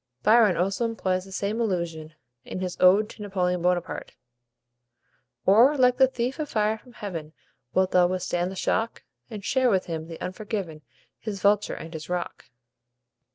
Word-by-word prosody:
Byron 220 -4 +5
also 195 +6 0
employs 185 -5 -1
the 195 - -13
same 205 +4 -2
allusion, 170 -7 -2 0.3
in - - -6
his 185 -1 -3
"Ode 195 +4 +6
to - - -13
Napoleon 180 -3 -1
Bonaparte": 180 0 -1 1.3
"Or, 240 +9 +6
like 250 -1 +4
the 265 0 +6
thief 255 +3 -3
of 300 -2 -3
fire 215 0 +1
from 245 +2 -18
heaven, 165 -8 -6 0.4
Wilt 185 0 +3
thou 180 -1 +5
withstand 180 -1 -1
the - - -7
shock? 225 +4 -1 0.3
And 210 -4 -7
share 260 +2 +2
with 190 -4 +1
him 160 -2 -5
the 165 -1 -9
unforgiven 185 -5 -5 0.4
His 210 -3 -5
vulture 205 +2 +2
and 165 +1 -9
his 155 0 -7
rock?" 180 -1 -4
190 Hz, 160 wpm, -26 LUFS, 180-220 Hz, 1.3 s, Ode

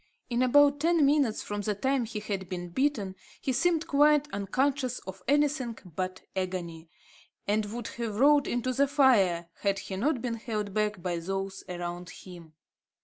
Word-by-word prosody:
In 240 +1 +1
about 285 +3 +5
ten 330 -1 +3
minutes 275 -6 +2
from 205 0 -4
the 210 0 -1
time 265 +3 0
he 215 -1 -5
had 195 -3 -4
been 175 -1 -5
bitten, 210 -3 0 0.2
he 265 - -1
seemed 330 +4 +2
quite 295 -1 +4
unconscious 255 +6 0
of 190 0 -8
anything 285 -4 +1 0.2
but 185 0 -3
agony; 175 -3 -4 0.6
and 210 +1 +1
would 235 +2 -5
have 230 -3 -4
rolled 285 +4 +5
into 245 +1 -1
the 280 +3 +3
fire, 200 - +3
had 200 -1 +1
he 195 - -6
not 260 +5 +1
been 235 -1 -3
held 215 -3 -4
back 210 -3 -1
by 175 -2 -1
those 195 +2 -4
around 175 0 -5
him. 170 -4 -12
215 Hz, 165 wpm, -29 LUFS, 190-275 Hz, 0.6 s, about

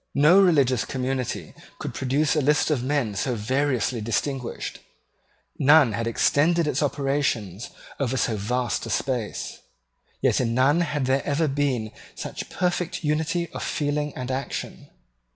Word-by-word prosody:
No 160 +7 +6
religious 140 - +3
community 125 - -3 0.2
could - - -5
produce 140 +4 +1
a 150 - +2
list 150 +3 +2
of 140 -5 +1
men 130 -5 0
so 120 +5 -1
variously 125 +1 0
distinguished: 125 +4 -3 0.8
none 145 -4 +6
had 115 +2 -2
extended 155 +8 +2
its 150 - 0
operations 135 - -1 0.3
over 130 -2 0
so 115 - +1
vast 120 +4 -1
a - - -6
space; 125 -6 -2 0.6
yet - - +2
in 115 -2 0
none 140 +6 +4
had 150 -5 -1
there 135 +1 +1
ever 150 +2 +1
been 135 -6 -1 0.2
such - - -6
perfect 180 -1 -1
unity 160 +3 0
of - - -5
feeling 150 0 -1
and 125 0 -4
action. 135 +1 -5
135 Hz, 140 wpm, -25 LUFS, 125-150 Hz, 0.8 s, No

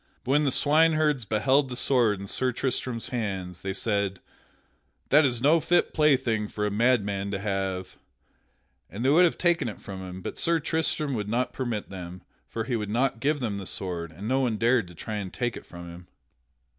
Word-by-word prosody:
But 130 - -2
when 145 +2 +3
the 135 - +2
swineherds 155 -3 +3
beheld 130 +7 +2
the 125 - -5
sword 120 -6 +2
in 100 - -6
Sir 130 +6 0
Tristram's 125 -2 -3
hands, 95 -7 -3
they 95 - -3
said, 100 -2 -1 0.9
"That 150 +1 +6
is 120 -2 0
no 155 +4 +5
fit 175 +2 +1
plaything 130 -8 +2
for 105 0 -3
a 105 - -1
madman 100 -3 +1
to 100 - -2
have," 95 -2 -3 0.9
and 105 +8 -5
they - - +4
would 170 +5 +6
have 170 - 0
taken 170 -8 +1
it 105 - -9
from 95 -1 -8
him, 95 0 -8
but - - -5
Sir 170 0 +3
Tristram 155 -2 -1
would 105 -3 -3
not 125 +3 0
permit 120 -7 -3
them, 90 -1 -8 0.2
for 115 - -4
he 120 +1 -2
would 105 -2 -3
not 120 +2 0
give 145 +3 0
them 105 -5 -2
the 95 - -6
sword, 85 -3 -2
and 95 +7 -8
no 130 +2 +2
one 120 -5 0
dared 115 -2 +2
to 90 - -13
try 105 +4 -4
to 95 - -6
take 120 +3 -2
it - - -10
from 85 0 -10
him. 85 +1 -11
115 Hz, 205 wpm, -26 LUFS, 100-135 Hz, 0.9 s, That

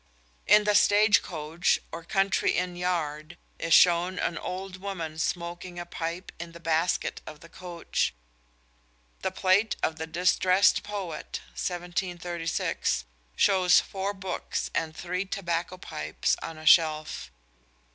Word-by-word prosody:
In 210 0 +7
The 210 0 +2
Stage 205 0 +5
Coach, 160 0 0
or 165 - -7
Country 195 +2 +1
Inn 180 0 -1
yard, 170 -2 -2 0.2
is 165 - -3
shown 180 +1 +5
an 170 - -1
old 185 +2 -5
woman 175 -5 -5
smoking 175 +2 -3
a 175 - -5
pipe 170 +1 -5
in 170 0 -7
the 170 - -11
"basket" 165 +1 0
of 150 -1 -10
the 165 - -13
coach. 175 -1 -2 1.1
The - - 0
plate 190 +3 +2
of 160 - 0
The 160 +1 -4
Distrest 185 +3 +3
Poet 190 -7 -5
(1736) 175 - -2 0.3
shows 185 -2 +5
four 195 +1 -3
books 190 -2 -4
and 160 -1 -2
three 180 +1 -2
tobacco 180 -2 -3
pipes 75 - -2
on 165 - -6
a 155 - -10
shelf. 155 - +3
175 Hz, 130 wpm, -27 LUFS, 165-185 Hz, 1.1 s, In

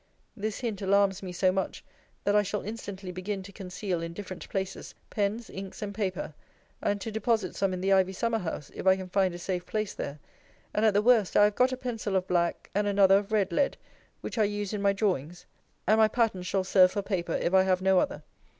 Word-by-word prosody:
This 215 0 -4
hint 220 -5 -3
alarms 200 0 +3
me 185 -2 -6
so 185 +1 +2
much, 190 0 -3 0.4
that 205 - +2
I 210 - +6
shall 205 +1 -3
instantly 200 -3 -6
begin 190 +2 -4
to 200 - -11
conceal, 185 -2 -4
in 165 0 -5
different 185 -1 -8
places, 190 -1 -4 0.2
pens, 210 +3 -1
inks, 190 +2 -7
and 200 -1 -4
paper; 190 -6 -3 0.5
and 205 0 0
to 225 - -4
deposit 220 -2 0
some 195 -1 +1
in 185 -1 -3
the 195 +1 +3
ivy 190 -1 +4
summer 230 +3 0
house, 160 -6 -5
if - - -5
I 190 - +7
can 190 -1 -7
find 190 -2 +1
a - - -5
safe 175 0 -3
place 215 +2 -3
there; 140 +1 -5 0.6
and, 210 - +2
at 210 - +2
the 205 - +4
worst, 225 -5 +4
I 205 - +7
have 210 0 +4
got 255 +4 +3
a 255 - -3
pencil 225 -6 -3
of 185 0 +1
black, 170 -1 0
and 205 +1 +1
another 195 -1 +5
of 205 +1 -9
red 205 -3 +2
lead, 275 +11 +1 0.4
which - - -4
I 215 - +5
use 205 0 -3
in 210 - -2
my 200 0 +4
drawings; 180 -5 -2 0.4
and 215 +2 +4
my 220 - +7
patterns 215 -5 0
shall 190 0 +1
serve 185 -1 +5
for 205 - -1
paper, 185 -4 -2
if 175 - 0
I 190 - +7
have 185 -1 +1
no 190 -1 +5
other. 285 +7 -2
195 Hz, 230 wpm, -28 LUFS, 185-210 Hz, 0.6 s, I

